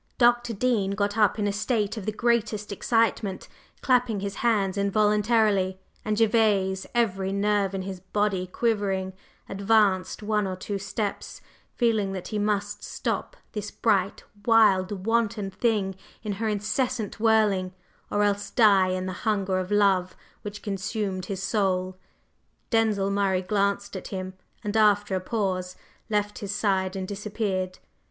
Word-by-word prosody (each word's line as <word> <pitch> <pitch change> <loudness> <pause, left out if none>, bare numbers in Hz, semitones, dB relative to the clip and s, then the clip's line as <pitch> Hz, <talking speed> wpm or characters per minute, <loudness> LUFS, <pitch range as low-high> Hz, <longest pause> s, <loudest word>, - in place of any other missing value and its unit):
Dr. 240 -1 +3
Dean 205 -3 +1
got 205 +1 0
up 210 -2 +3
in 210 - 0
a 205 - 0
state 215 0 0
of 215 -3 -7
the - - +1
greatest 215 -2 0
excitement, 215 -2 0 0.3
clapping 245 -5 +2
his 200 0 -4
hands 205 -5 +1
involuntarily; 205 -1 +2 0.2
and 215 0 -1
Gervase, 210 -4 +2
every 195 -5 +1
nerve 200 -1 +1
in 190 - -3
his 190 -1 -6
body 190 0 -1
quivering, 195 -3 -1 0.3
advanced 200 -1 +2
one 210 -1 +1
or 185 - -3
two 200 +2 -4
steps, 200 +1 -4 0.4
feeling 220 -5 +1
that 185 -2 -6
he 215 - -2
must 205 0 -1
stop - - -3
this 210 -1 -4
bright, 200 -4 0 0.2
wild, 200 -4 +3
wanton 225 -3 0
thing 200 -1 0 0.3
in 215 - -3
her 225 - +1
incessant 215 +2 -1
whirling, 210 -4 +3 0.4
or 205 - +1
else 205 0 0
die 200 -5 +5
in 185 0 -2
the 185 - -3 0.2
hunger 195 -3 +1
of 185 0 -4
love 195 -3 +2 0.3
which 205 0 -7
consumed 195 -2 -3
his 195 -1 -4
soul. 185 -3 0 0.8
Denzil 215 -4 +2
Murray 195 -2 +1
glanced 200 +1 0
at 190 - -6
him, 185 -1 -5 0.3
and, 210 +1 -3
after 205 -2 +3
a 185 - +1
pause, 185 -3 -2 0.3
left 210 -1 -1
his 200 -1 -4
side 190 -2 0
and 190 -1 -4
disappeared. 200 -2 -3
205 Hz, 145 wpm, -26 LUFS, 190-215 Hz, 0.8 s, die